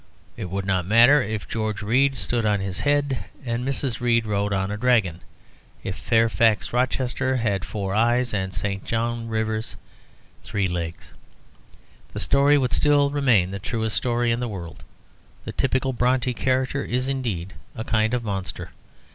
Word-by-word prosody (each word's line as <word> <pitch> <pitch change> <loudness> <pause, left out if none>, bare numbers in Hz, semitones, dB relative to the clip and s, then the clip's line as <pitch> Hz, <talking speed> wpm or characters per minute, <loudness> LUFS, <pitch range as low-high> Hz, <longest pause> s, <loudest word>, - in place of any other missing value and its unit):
It - - -5
would 95 +1 -3
not 95 -3 0
matter 120 +7 +6
if 110 -2 -4
George 110 -2 -3
Read 130 +6 +2
stood 120 -1 -1
on 105 -1 +2
his 95 0 -3
head, 145 0 0 0.2
and 120 0 -2
Mrs. 135 -2 -2
Read 115 -2 +2
rode 100 -1 -1
on 95 0 0
a - - -2
dragon, 110 -8 +2 0.6
if 95 - -3
Fairfax 115 -1 +2
Rochester 130 +1 0
had 105 -6 0
four 100 -2 -4
eyes 120 +3 +2
and 95 -2 -1
St. 100 +2 -2
John 115 0 -2
Rivers 110 0 -2 0.7
three 100 -2 -1
legs, 85 -2 -5 1.0
the - - -4
story 145 +1 +4
would 130 -3 0
still 145 -1 +3
remain 120 -11 +3
the 100 - -5
truest 110 +1 -2
story 120 -1 +1
in 115 - 0
the 125 - -2
world. 90 -6 -8 0.6
The - - -4
typical 130 0 0
Brontë 125 +1 +1
character 130 +3 0
is, 125 +2 -1
indeed, 110 -10 -3 0.2
a 110 - -4
kind 110 +1 +1
of 120 - -2
monster. 95 -3 -4
115 Hz, 160 wpm, -24 LUFS, 100-125 Hz, 1.0 s, matter